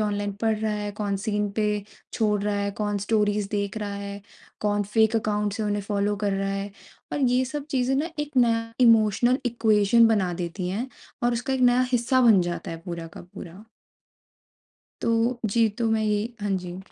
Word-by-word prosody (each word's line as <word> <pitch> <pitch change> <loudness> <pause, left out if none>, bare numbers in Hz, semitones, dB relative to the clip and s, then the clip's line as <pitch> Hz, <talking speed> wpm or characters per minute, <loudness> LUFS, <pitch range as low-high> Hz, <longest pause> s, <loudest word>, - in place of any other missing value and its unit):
Online 205 -1 -1
पढ़ 220 -1 +2
रहा 215 0 -1
है, 210 0 -3
कौन 205 -1 -2
सीन 210 -1 -1
पे 210 -1 -1 0.3
छोड़ 210 -2 +1
रहा 210 0 0
है, 200 0 -1
कौन 205 0 -2
स्टोरीज़ 205 -1 0
देख 200 0 -2
रहा 205 -1 -4
है, 200 0 -6 0.4
कौन 205 0 +1
फ़ेक 220 0 +4
अकाउंट 210 -1 0
से 220 - -3
उन्हें 205 -1 -1
फॉलो 205 0 -1
कर 200 - +1
रहा 195 0 -1
है। 195 +1 -3 0.4
और 290 - -1
ये 255 0 +3
सब 285 +2 -5
चीज़ें 260 0 +1
ना 305 +5 -1
एक 295 -1 -4
नया 230 -2 +2
इमोशनल 230 +1 +4
इक्वेशन 225 -1 +4
बना 195 -5 +1
देती 180 +1 -4
हैं, 220 +8 -3 0.3
और 240 0 +2
उसका 245 +3 -2
एक 260 - -2
नया 245 - +3
हिस्सा 250 +2 +2
बन 220 -6 +6
जाता 175 -1 -4
है - - -5
पूरा 170 -2 -5
का - - -7
पूरा। 185 +5 -10 1.4
तो 230 +2 +1
जी, 225 +2 +3
तो 225 +2 -2
मैं 220 0 +1
ये 210 -1 +1 0.2
हाँ 205 - -1
जी। 180 0 -7
210 Hz, 190 wpm, -25 LUFS, 200-230 Hz, 1.4 s, बन